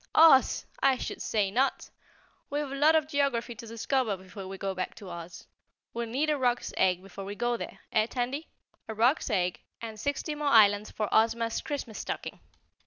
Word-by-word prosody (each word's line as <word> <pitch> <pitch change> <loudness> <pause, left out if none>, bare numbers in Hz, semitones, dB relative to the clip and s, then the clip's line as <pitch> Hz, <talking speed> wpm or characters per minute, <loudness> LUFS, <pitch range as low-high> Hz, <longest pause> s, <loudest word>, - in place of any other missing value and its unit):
"OZ, 315 -5 +6 0.2
I 270 -1 +4
should - - -5
say 205 -3 0
not! 260 +6 0 0.6
We've 290 -1 -2
a - - -4
lot 300 +3 +4
of 315 -2 +3
geography 280 -5 0
to 230 0 -10
discover 230 -1 -1
before 190 +1 -10
we 195 0 -7
go 195 0 -2
back 185 -1 -4
to 195 -4 -10
Oz. 170 0 -9 0.5
We'll 235 0 -3
need 290 +6 +1
a 295 - 0
roc's 245 -1 0
egg 185 -1 +2
before 195 0 -9
we 200 +1 -6
go 240 +2 0
there, - - -7
eh, 215 0 +2
Tandy? 255 +6 -3 0.4
A 220 - -5
roc's 245 +8 +2
egg 180 -5 0 0.2
and 220 -2 -7
sixty 285 +5 -2
more 295 0 -3
islands 210 -4 +5
for 215 - -2
Ozma's 230 +1 +2
Christmas 270 -7 -5
stocking." - - -5
230 Hz, 185 wpm, -29 LUFS, 205-275 Hz, 0.6 s, OZ